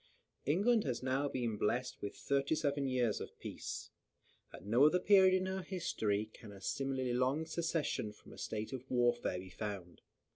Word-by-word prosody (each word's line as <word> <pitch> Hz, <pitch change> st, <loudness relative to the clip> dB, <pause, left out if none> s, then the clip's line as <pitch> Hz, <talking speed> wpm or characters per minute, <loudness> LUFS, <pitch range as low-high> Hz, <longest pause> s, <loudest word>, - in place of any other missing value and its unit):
England 210 Hz, +9 st, +4 dB
has 130 Hz, -2 st, -2 dB
now 135 Hz, +2 st, +1 dB
been 120 Hz, -5 st, -2 dB
blest 125 Hz, +5 st, -1 dB
with 100 Hz, -, -4 dB
thirty 140 Hz, +2 st, +1 dB
seven 145 Hz, -3 st, 0 dB
years 125 Hz, -4 st, +1 dB
of -, -, -8 dB
peace. -, -, -6 dB, 0.6 s
At -, -, -11 dB
no 115 Hz, +6 st, +4 dB
other 175 Hz, -, +4 dB
period 185 Hz, -1 st, +6 dB
of 190 Hz, -, -1 dB
her 190 Hz, -, -2 dB
history 110 Hz, -, -1 dB
can 110 Hz, -3 st, -11 dB
a 100 Hz, -, -11 dB
similarly 130 Hz, +3 st, -1 dB
long 130 Hz, +6 st, +1 dB
cessation 165 Hz, -9 st, -1 dB
from 105 Hz, -, -15 dB
a -, -, -12 dB
state 110 Hz, +3 st, -4 dB
of 130 Hz, -1 st, -6 dB
warfare 120 Hz, -5 st, +2 dB
be 90 Hz, 0 st, -8 dB
found. 95 Hz, -4 st, -6 dB
130 Hz, 175 wpm, -35 LUFS, 110-155 Hz, 0.6 s, period